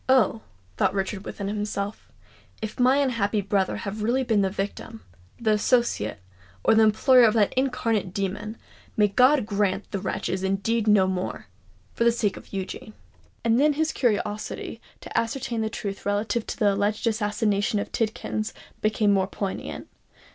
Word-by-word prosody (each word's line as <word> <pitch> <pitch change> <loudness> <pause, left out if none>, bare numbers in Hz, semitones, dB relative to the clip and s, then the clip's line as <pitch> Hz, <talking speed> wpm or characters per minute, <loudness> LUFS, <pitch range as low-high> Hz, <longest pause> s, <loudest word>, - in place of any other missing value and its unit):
"Oh!" 225 -4 +4 0.4
thought 190 - +2
Richard 195 +1 -2
within 200 - -5
himself, 205 0 -4 0.5
"if 220 +2 -6
my 255 +2 +5
unhappy 230 -7 +1
brother 200 -1 0
have 210 0 -5
really 245 +5 +1
been 225 -5 +2
the 195 - +2
victim, 205 +3 -5 0.4
the 220 -2 +1
associate, 210 - +1 0.4
or - - +5
the 220 - +5
employer 220 +4 +5
of 225 -1 +5
that 210 -3 +3
incarnate 230 -7 0
demon, 200 +3 -3 0.4
may 210 -1 +4
God 255 +4 +4
grant 200 -1 0
that - - -32
the 200 - -2
wretch - - -3
is 185 - -2
indeed 200 +4 0
no 205 -3 +5
more—for 100 - -5
the 235 - +5
sake 215 -4 0
of - - -13
Eugene!" 195 +2 -6 0.5
And 230 +1 +4
then 295 +1 +4
his 315 +2 0
curiosity 215 -1 -2 0.2
to - - -10
ascertain 230 0 -1
the 220 - -1
truth 200 -3 -5
relative 205 +3 -1
to - - -4
the 205 -2 +3
alleged 205 +3 0
assassination 210 -1 +1
of 200 - -3
Tidkins, 215 -1 -2 0.3
became 215 -1 +2
more 190 -1 +2
poignant. 195 -1 -5
210 Hz, 160 wpm, -25 LUFS, 200-230 Hz, 0.5 s, my